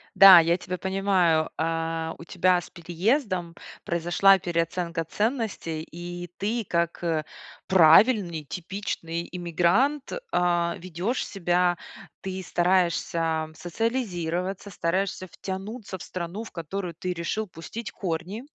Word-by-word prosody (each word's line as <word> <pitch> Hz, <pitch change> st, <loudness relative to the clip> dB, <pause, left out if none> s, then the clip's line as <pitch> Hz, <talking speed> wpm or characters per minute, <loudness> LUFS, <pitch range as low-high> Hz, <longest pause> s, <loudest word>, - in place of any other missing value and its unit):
Да, 195 Hz, -3 st, +11 dB
я 170 Hz, +1 st, +2 dB
тебя 185 Hz, 0 st, -5 dB
понимаю. 190 Hz, -4 st, +2 dB
А, 165 Hz, 0 st, -2 dB
у 165 Hz, -, -10 dB
тебя 180 Hz, 0 st, +2 dB
с -, -, -13 dB
переездом 180 Hz, -, -1 dB, 0.3 s
произошла 175 Hz, +3 st, +4 dB
переоценка 170 Hz, -1 st, -2 dB
ценностей, 210 Hz, -, -2 dB
и 175 Hz, +1 st, -7 dB
ты 220 Hz, +3 st, -1 dB
как, 170 Hz, 0 st, -1 dB
э, 160 Hz, -3 st, 0 dB, 0.4 s
правильный 175 Hz, -1 st, +5 dB
типичный 170 Hz, 0 st, -4 dB
иммигрант, 180 Hz, -, +1 dB, 0.2 s
а, 175 Hz, -1 st, +2 dB
ведёшь 185 Hz, +8 st, -2 dB
себя. 175 Hz, -2 st, +1 dB, 0.4 s
Ты 190 Hz, 0 st, -5 dB
стараешься 170 Hz, -3 st, +1 dB
социализироваться, 185 Hz, -2 st, -2 dB
стараешься 185 Hz, +1 st, -1 dB
втянуться 190 Hz, +4 st, -6 dB
в -, -, -9 dB
страну, 185 Hz, +4 st, -5 dB
в -, -, -10 dB
которую 175 Hz, +1 st, -5 dB
ты 180 Hz, +3 st, -3 dB
решил 180 Hz, +6 st, -2 dB
пустить 205 Hz, +6 st, -7 dB
корни. 180 Hz, +5 st, -4 dB
175 Hz, 115 wpm, -26 LUFS, 170-195 Hz, 0.4 s, Да